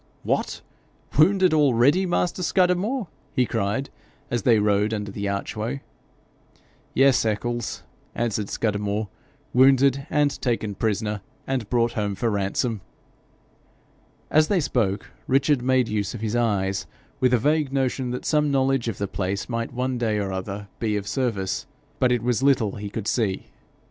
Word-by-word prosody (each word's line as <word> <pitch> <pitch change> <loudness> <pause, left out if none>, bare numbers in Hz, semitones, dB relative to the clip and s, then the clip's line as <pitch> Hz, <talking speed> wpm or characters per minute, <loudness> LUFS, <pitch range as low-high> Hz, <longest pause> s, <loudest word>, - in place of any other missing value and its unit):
'What! - - -1 0.5
wounded 185 +3 +5
already, 145 +5 +4
master 175 +1 0
Scudamore!' 185 +6 +1 0.3
he 125 - +3
cried, 115 +4 -2 0.4
as 120 -1 0
they 115 +1 +4
rode 105 +1 +2
under 105 -1 -4
the 100 0 -3
archway. 110 +6 -3 1.1
'Yes, 135 0 +5
Eccles,' 115 +2 -2 0.3
answered 110 -3 -1
Scudamore, 105 -1 -1 0.2
' - - -36
wounded 135 +2 +4
and 145 -2 +1
taken 115 -4 -1
prisoner, 105 0 -1 0.2
and 130 -5 -2
brought 120 -1 +2
home 105 -3 -2
for 115 +3 0
ransom!' 100 +2 -1 1.5
As 155 0 +5
they 200 - +2
spoke, 110 - -1 0.2
Richard 135 0 +3
made 130 -1 +2
use 105 0 -2
of 115 - -7
his 110 0 -1
eyes, 95 -5 0 0.3
with 130 -1 +3
a 125 - +5
vague 150 +3 +1
notion 130 -1 0
that 125 +1 -4
some 150 -1 +2
knowledge 135 -3 +1
of 110 -4 -2
the 100 - -2
place 95 +1 -3
might 115 -1 -3
one 125 0 -2
day 110 -3 +1
or 100 -2 -2
other 100 +2 -5
be 110 -2 0
of 100 -1 -5
service, 100 -7 -1 0.3
but 125 - +3
it 120 -2 +1
was 125 0 +1
little 130 -7 +2
he 100 0 -5
could 105 0 -5
see. 105 -7 -1
120 Hz, 155 wpm, -24 LUFS, 105-135 Hz, 1.5 s, wounded